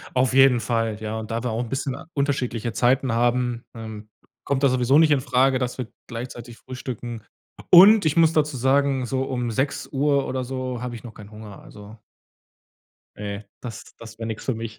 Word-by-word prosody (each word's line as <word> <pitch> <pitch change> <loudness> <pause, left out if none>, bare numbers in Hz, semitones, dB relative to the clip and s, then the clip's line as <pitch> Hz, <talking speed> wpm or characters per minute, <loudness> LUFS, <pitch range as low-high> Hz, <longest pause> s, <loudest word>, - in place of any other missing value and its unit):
Auf 125 0 +2
jeden 135 -2 +6
Fall, 115 -3 -1
ja. 110 +1 -4
Und 110 +1 -7
da 115 +2 -2
wir 120 - -1
auch 115 +2 -2
'n 115 - -8
bisschen 135 -1 -2 0.2
unterschiedliche 125 -5 -1
Zeiten 130 +1 +2
haben, 120 0 0
ähm, 110 -2 -8 0.3
kommt 140 0 -1
das 135 - +5
sowieso 130 +3 +3
nicht 160 -1 +5
infrage, 130 -1 +2
dass 125 0 -3
wir 125 -3 -4 0.2
gleichzeitig 120 0 -8
frühstücken. 120 -3 -7 0.5
Und 195 +2 +8
ich 155 +2 +1
muss 165 -1 +5
dazu 150 -3 +1
sagen, 135 0 +2
so 130 +2 -1
um 125 -3 -3
06:00 140 +2 0
oder 130 -1 -2
so 130 -1 -4
habe 125 -1 -5
ich 115 - -10
noch 115 - -10
keinen 105 0 -13
Hunger, 105 -2 -11
also. 105 +2 -13 1.2
Ne, 100 0 -6 0.2
das 120 -3 -9
das 110 -1 -12
wär 115 - -4
nix 110 -1 -5
für 130 - -1
mich. 115 -1 -7
125 Hz, 185 wpm, -23 LUFS, 115-135 Hz, 1.2 s, Und